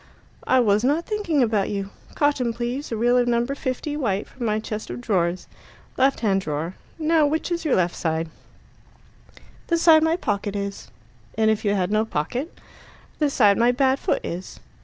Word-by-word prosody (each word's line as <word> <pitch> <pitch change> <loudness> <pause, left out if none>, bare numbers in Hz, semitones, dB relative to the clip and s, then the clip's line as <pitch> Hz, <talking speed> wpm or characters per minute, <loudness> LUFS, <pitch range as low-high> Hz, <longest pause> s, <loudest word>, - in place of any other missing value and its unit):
"I 260 - +4
was 210 -2 +3
not 295 +6 +1
thinking 350 - 0
about 215 -4 +1
you. 200 -1 -4 0.2
Cotton, 280 -5 +1
please 240 +4 -4
a 225 - -2
reel 240 +2 +3
of 245 - +1
No. 235 0 +2
50 275 +2 -3
white 205 -8 -1
from 240 -3 -5
my 215 0 +1
chest 215 0 -6
of - - -5
drawers. 185 -6 0 0.5
Left 270 +1 +2
hand 195 -4 +2
drawer. 160 +1 -3 0.2
Now 315 -1 +3
which 315 +4 -2
is 340 -1 -2
your 300 - +3
left 175 -1 0
hand?" 160 0 -1 1.4
"The 335 - +2
side 325 -2 +6
my 320 +1 +2
pocket 205 - -2
is." 200 0 -5 0.5
"And 220 0 +4
if 215 - -1
you 205 -1 +1
had 185 0 0
no 215 +1 +2
pocket?" 235 - -3 0.7
"The 300 -2 +2
side 210 -7 +4
my 240 +1 +4
bad 265 +1 +2
foot - - -1
is." 180 +2 -6
235 Hz, 180 wpm, -23 LUFS, 200-285 Hz, 1.4 s, side